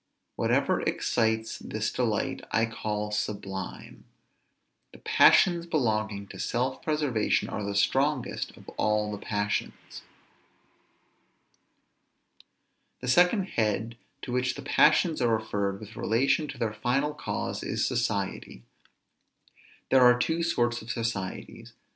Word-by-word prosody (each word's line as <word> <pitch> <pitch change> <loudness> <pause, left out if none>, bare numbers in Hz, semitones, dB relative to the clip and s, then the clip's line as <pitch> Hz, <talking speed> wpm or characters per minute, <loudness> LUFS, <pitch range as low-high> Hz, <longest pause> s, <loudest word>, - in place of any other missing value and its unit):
Whatever - - +1
excites 110 -1 0
this - - -3
delight, - - -1
I 115 - +2
call 105 -2 -4
sublime. 100 -2 -5 0.9
The - - -12
passions 170 -2 +4
belonging 110 -9 -1
to - - -10
self 130 +2 -1
preservation 150 -8 0
are 105 - -4
the 100 0 -3
strongest 135 +5 0
of - - -16
all 105 0 +1
the 105 - -5
passions. 105 0 -3 3.0
The 125 - -5
second 180 - +4
head 110 +1 -1 0.3
to - - -5
which 125 +1 0
the 140 - -8
passions 155 +3 +3
are 120 -2 +3
referred 100 -2 -2
with 110 0 -11
relation 135 +7 +1
to 135 - -8
their 115 -3 -1
final 135 +7 0
cause, 150 - -4
is - - -1
society. 105 - -2 1.3
There 130 - +6
are 125 -1 +7
two 160 +7 0
sorts 120 -8 0
of 110 - -12
societies. 115 -5 -4
115 Hz, 115 wpm, -28 LUFS, 105-135 Hz, 3.0 s, are